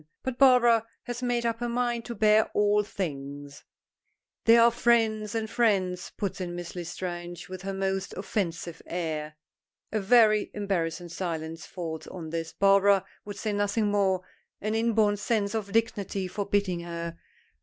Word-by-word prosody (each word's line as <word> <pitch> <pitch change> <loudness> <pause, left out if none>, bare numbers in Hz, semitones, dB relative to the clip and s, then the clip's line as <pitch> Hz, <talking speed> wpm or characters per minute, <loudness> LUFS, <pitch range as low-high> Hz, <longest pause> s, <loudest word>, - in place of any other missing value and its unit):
But 260 -1 -4
Barbara 240 -4 +6 0.2
has 245 0 -5
made 245 -1 0
up 230 -1 0
her 240 0 -2
mind 240 -1 -1
to 235 - -5
bear 215 +1 +4
all 210 0 +4
things. 145 -8 -6 0.8
"There 230 +1 +7
are 235 +1 +7
friends 225 -3 +2
and 220 -1 -1
friends," 195 -6 +1
puts 200 -2 -3
in 175 -1 -4
Miss 175 0 -7
L'Estrange 175 0 -5
with 185 0 -7
her 195 0 -4
most 195 0 -2
offensive 175 -4 -3
air. 155 -3 -3 0.6
A 215 - 0
very 215 0 +4
embarrassing 175 -4 -2
silence 165 -2 -4
falls 165 -3 -6
on 165 -4 -7
this, 165 -1 -3
Barbara 195 0 +4 0.2
would 205 -1 -7
say 215 +1 -2
nothing 205 +1 +1
more, 190 -2 +2 0.4
an 215 +1 -2
inborn 220 -2 +2
sense 210 -1 0
of 210 -3 -3
dignity 200 -3 0
forbidding 200 -2 -1
her. 170 -1 -6
200 Hz, 150 wpm, -28 LUFS, 175-220 Hz, 0.8 s, There